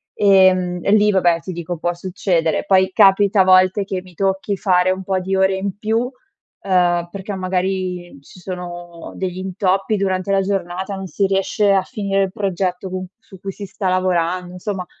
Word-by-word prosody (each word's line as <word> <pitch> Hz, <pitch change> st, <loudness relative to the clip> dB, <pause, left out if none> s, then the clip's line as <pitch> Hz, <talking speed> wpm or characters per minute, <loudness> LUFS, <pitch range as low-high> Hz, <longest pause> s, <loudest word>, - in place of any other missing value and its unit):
Ehm, 185 Hz, -3 st, +4 dB
e -, -, 0 dB
lì 210 Hz, 0 st, +5 dB
vabbè, 175 Hz, -3 st, +3 dB
ti 185 Hz, -, -6 dB
dico 175 Hz, 0 st, -5 dB
può 175 Hz, +2 st, -1 dB
succedere. 175 Hz, -2 st, -1 dB
Poi 190 Hz, -1 st, +3 dB
capita 200 Hz, 0 st, +5 dB
a -, -, +6 dB
volte 185 Hz, +2 st, +4 dB
che 190 Hz, -1 st, -4 dB
mi 180 Hz, -1 st, -16 dB
tocchi 195 Hz, +1 st, -1 dB
fare 185 Hz, -2 st, +2 dB
un 190 Hz, 0 st, -3 dB
po' 190 Hz, 0 st, -1 dB
di 190 Hz, +1 st, -2 dB
ore 190 Hz, 0 st, +3 dB
in 195 Hz, +1 st, -4 dB
più, 220 Hz, +2 st, 0 dB
uhm, 190 Hz, -, -2 dB
perché 200 Hz, 0 st, -6 dB
magari 185 Hz, -2 st, -3 dB
ci 180 Hz, -, -16 dB
sono 175 Hz, -2 st, -8 dB
degli 185 Hz, -1 st, -4 dB
intoppi 190 Hz, +2 st, 0 dB
durante 190 Hz, 0 st, -1 dB
la 195 Hz, -, +3 dB
giornata, 190 Hz, 0 st, -3 dB
non 190 Hz, -, -6 dB
si 195 Hz, +5 st, 0 dB
riesce 195 Hz, +1 st, +1 dB
a 195 Hz, -1 st, +3 dB
finire 200 Hz, -4 st, -1 dB
il 190 Hz, -, -3 dB
progetto 190 Hz, -2 st, -2 dB
con 185 Hz, 0 st, -4 dB
c -, -, -34 dB, 0.2 s
su 190 Hz, -, -14 dB
cui 195 Hz, +1 st, -5 dB
si 200 Hz, +1 st, -8 dB
sta 190 Hz, 0 st, -3 dB
lavorando 180 Hz, -1 st, 0 dB
insomma 180 Hz, 0 st, -4 dB
190 Hz, 190 wpm, -19 LUFS, 180-195 Hz, 0.2 s, a